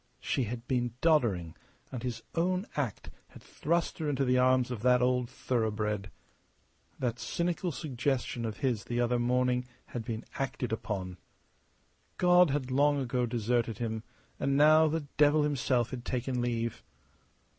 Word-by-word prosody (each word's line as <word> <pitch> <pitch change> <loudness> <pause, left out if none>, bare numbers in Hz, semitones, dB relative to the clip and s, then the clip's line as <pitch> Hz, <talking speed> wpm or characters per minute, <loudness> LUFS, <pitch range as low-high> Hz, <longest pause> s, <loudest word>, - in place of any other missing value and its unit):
She 130 - -1
had 115 +2 -6
been 120 -3 0
doddering, 110 - +2 0.4
and 125 -3 -5
his 125 -2 -4
own 180 +3 0
act 130 -9 -3 0.2
had - - -15
thrust 170 +3 -1
her 155 -2 -1
into 135 -1 +1
the 125 0 +3
arms 130 0 +3
of 120 -4 -4
that 125 +1 +4
old 125 -1 +1
thoroughbred. 105 -5 -1 0.9
That 125 -1 -2
cynical 175 +1 -1
suggestion 135 -4 -2
of 110 -2 -4
his 120 -5 0
the 120 0 -2
other 120 0 +2
morning 125 +1 +1 0.2
had 120 - -5
been 110 0 -5
acted 130 -3 -2
upon. 95 -5 -4 1.0
God 180 -1 +5
had 135 -2 -2
long 145 +2 +3
ago 125 -2 0
deserted 115 -1 0
him, 110 -2 -3 0.4
and 140 0 +1
now 155 +2 +6
the 155 -1 -1
devil 150 +1 +5
himself 130 -4 +1
had 125 -2 -5
taken 125 0 -2
leave. 115 -1 -2
125 Hz, 150 wpm, -30 LUFS, 115-140 Hz, 1.0 s, now